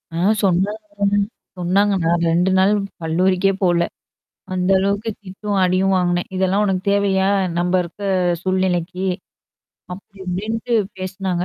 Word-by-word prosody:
ஆ. - - -2 0.3
சொன்னாங்க 205 +2 0 0.5
சொன்னாங்க 195 +3 +2
நான் 170 0 +2
2 180 +3 +2
நாள் 190 +2 +4 0.3
கல்லூரிக்கே 185 +4 +2
போல. 175 -1 +3 0.7
அந்த 185 +1 +1
அளவுக்கு 200 +3 0
திட்டும், 200 +2 -4
அடியும் 185 +1 +2
வாங்குனேன். 175 -1 0
இதெல்லாம் 190 +2 +2
உனக்கு 190 -2 0
தேவையா? 195 -1 +2 0.3
நம்ப 175 +1 0
இருக்க 175 +4 -10 0.4
சூழ்நிலைக்கு. 185 0 -1 0.9
அப்படி 195 +2 -12
இப்டின்ட்டு 220 +6 -2 0.2
பேசினாங்க. 185 -1 -2
190 Hz, 115 wpm, -20 LUFS, 180-200 Hz, 0.9 s, நாள்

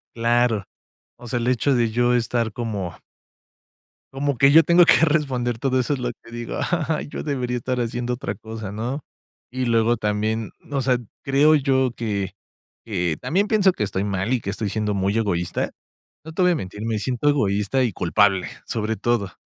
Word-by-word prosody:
Claro, 115 -3 +2 0.5
o 120 - -11
sea, 120 +1 -1
el 120 - -2
hecho 130 +2 +2
de 120 -2 +2
yo 120 +1 +2
estar 115 -2 0
como 105 -7 -4 1.2
como 140 -1 -1
que 135 +3 +6
yo 165 +3 +8
tengo 170 +3 +6
que 165 -1 +5
responder 130 -6 0
todo 130 +1 +1
eso 130 +4 0
es 135 - -3
lo 125 -1 -2
que 115 - -15
digo, 120 0 -5 0.3
ay 155 - -1
yo - - -6
debería 125 -4 -2
estar 125 +1 -2
haciendo 120 +1 -2
otra 105 -5 -4
cosa, 110 -1 -7
¿no? 125 +7 -4 0.4
Y 130 +1 -3
luego 115 0 +3
también, 105 0 -1 0.2
o 140 -2 -1
sea, 125 -1 +2 0.3
creo 145 +3 +4
yo 130 -3 +2
que 100 -5 -2 0.5
que 90 -7 -1
también 200 +5 +1
pienso 200 -4 +4
que - - -2
estoy 95 -1 -2
mal 100 +3 -1
y 125 - 0
que 100 - -5
estoy 105 +1 -2
siendo 105 0 -1
muy 100 +1 0
egoísta. 90 -6 -1 0.6
No 160 - -8
te 180 - 0
voy 180 - +5
a - - +2
mentir, 100 -2 -6
me 110 -2 0
siento 125 +5 0
egoísta 105 -1 +1
y 120 -5 0
culpable, 95 +2 +2 0.2
sobre 110 0 -2
todo. 105 -2 0
120 Hz, 190 wpm, -23 LUFS, 105-130 Hz, 1.2 s, yo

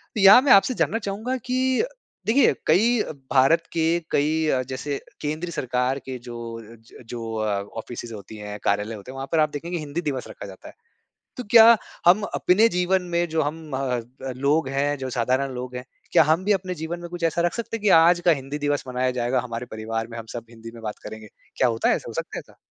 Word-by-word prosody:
तो 215 - 0
यहाँ 200 +6 +9
मैं 275 -1 +2
आपसे 200 +6 +6
जानना 225 -1 0
चाहूँगा 220 +5 -3
कि 255 - 0 0.4
देखिए 255 +5 +4
कई 220 +8 +4 0.3
भारत 140 +5 +4
के 165 +1 +2
कई 155 +2 +1
अ, 130 -4 +2
जैसे 135 +2 -4 0.2
केंद्र 155 +4 -3
सरकार 125 -1 -1
के 130 - -4
जो 120 - -6 0.4
अ, - - -13
ज 115 +2 -17
जो 115 -2 -5
अ, 105 -2 -1 0.2
ऑफिसेस 120 +1 -7
होती 105 +1 -10
है, 105 0 -7
कार्यालय 105 +2 0
होते 105 +5 -10
हैं - - -11
वहाँ 135 0 -5
पर 165 - +2
आप 155 0 +3
देखेंगे 165 +5 -5
हिंदी 155 +1 -4
दिवस 140 -6 -3
रखा - - -9
जाता 95 -1 -12
है। - - -12 0.6
तो 250 - -4
क्या 230 0 +9 0.3
हम 185 +5 +6
अपने 215 +5 +4
जीवन 180 0 +1
में 170 0 +2
जो 160 0 0
हम 155 +1 -5
अ - - -2 0.2
अ, 125 +3 -8
लोग 140 +2 +1
हैं, 140 +2 0
जो 130 -1 -4
साधारण 130 +3 0
लोग 125 0 -6
हैं 125 - -6 0.3
क्या - - +7
हम 160 +5 +2
भी 210 - +3
अपने 185 -2 -2
जीवन 165 +1 -5
में 175 - -7
कुछ 175 -1 -7
ऐसा 165 +1 +1
रख 175 - 0
सकते 230 -1 -4
हैं 225 - -10
कि 210 - +2
आज 175 +1 +5
का 175 - +6
हिंदी 135 +3 -6
दिवस 145 -1 -1
मनाया 125 0 0
जाएगा 125 +2 +1
हमारे 120 0 -6
परिवार 110 +1 -4
में 115 - -7
हम 115 - -8
सब 115 -1 -7
हिंदी 115 -1 -11
में 115 - -11
बात 105 -1 -5
करेंगे? 110 0 -9 0.3
क्या 130 - +3
होता 115 -1 0
है - - +4
ऐसा? - - -8
हो - - -6
सकता - - -5
है - - -4
ऐसा? - - -19
145 Hz, 235 wpm, -24 LUFS, 120-175 Hz, 0.6 s, यहाँ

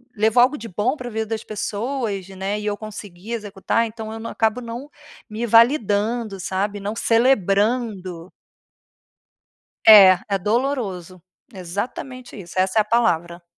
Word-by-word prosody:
levou 220 +2 +3
algo 260 +5 +3
de 230 - -8
bom 220 - -1
pra 245 -3 -6
vida 220 0 -3
das 225 0 -4
pessoas 215 -1 -3
né, 195 +2 -3
e 210 - -7
eu 210 -1 -1
consegui 205 -1 -9
executar." 210 +1 -1
Então 220 -1 -7
eu 225 - -7
na 230 - -6
acabo 225 +2 0
não 240 +4 -7 0.4
me 220 +2 -3
validando, 225 -2 +2
sabe. 200 +3 -2
Não 205 +2 -4
celebrando. 210 -6 +1 1.6
É, 195 -4 +9
é 200 -1 0
doloroso. 200 -6 -2 0.3
Exatamente 220 +7 -6
isso, 175 -2 -11
essa 185 +3 +2
é - - +6
a - - -15
palavra. 175 -6 0
215 Hz, 140 wpm, -21 LUFS, 195-230 Hz, 1.6 s, É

